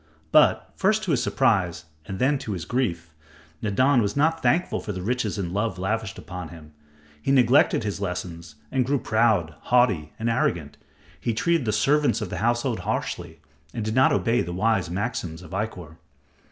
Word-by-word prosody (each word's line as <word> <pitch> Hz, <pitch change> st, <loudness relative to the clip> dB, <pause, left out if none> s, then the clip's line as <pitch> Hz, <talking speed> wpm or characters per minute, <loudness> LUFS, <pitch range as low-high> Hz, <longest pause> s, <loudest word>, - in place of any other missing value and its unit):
But, -, -, +4 dB
first 215 Hz, +3 st, +2 dB
to 185 Hz, -, -1 dB
his 130 Hz, -5 st, +2 dB
surprise, 90 Hz, -10 st, +1 dB, 0.2 s
and 95 Hz, -, -5 dB
then 135 Hz, +4 st, +2 dB
to 110 Hz, -6 st, -4 dB
his 85 Hz, -4 st, -5 dB
grief, 90 Hz, -9 st, -2 dB, 0.5 s
Nadan 125 Hz, +5 st, +3 dB
was 105 Hz, +4 st, -2 dB
not 160 Hz, +3 st, +2 dB
thankful 160 Hz, +7 st, +1 dB
for 105 Hz, -, -5 dB
the 95 Hz, -, -5 dB
riches 115 Hz, -1 st, -1 dB
and 90 Hz, -3 st, -3 dB
love 105 Hz, +2 st, -1 dB
lavished 105 Hz, +2 st, -2 dB
upon 90 Hz, -2 st, -7 dB
him. 80 Hz, -2 st, -13 dB, 0.5 s
He 135 Hz, -, 0 dB
neglected 130 Hz, -2 st, +4 dB
his 105 Hz, -1 st, -3 dB
lessons 90 Hz, -4 st, -5 dB, 0.2 s
and 130 Hz, -, +2 dB
grew 140 Hz, +3 st, +1 dB
proud, 110 Hz, -, +1 dB
haughty 110 Hz, -12 st, +2 dB
and 115 Hz, -, -3 dB
arrogant. 85 Hz, -9 st, 0 dB, 0.4 s
He 115 Hz, -2 st, -2 dB
treated 170 Hz, +2 st, +1 dB
the 110 Hz, -, +1 dB
servants 140 Hz, +8 st, +2 dB
of 105 Hz, -, -5 dB
the -, -, -3 dB
household 120 Hz, +1 st, 0 dB
harshly -, -, -4 dB, 0.3 s
and 110 Hz, -3 st, -3 dB
did 110 Hz, -, -2 dB
not 130 Hz, +2 st, +4 dB
obey 120 Hz, +1 st, +2 dB
the 85 Hz, -, -4 dB
wise 110 Hz, 0 st, +1 dB
maxims 90 Hz, -3 st, -3 dB
of 80 Hz, -, -13 dB
Ikkor. 95 Hz, -5 st, -5 dB
110 Hz, 180 wpm, -25 LUFS, 90-125 Hz, 0.5 s, But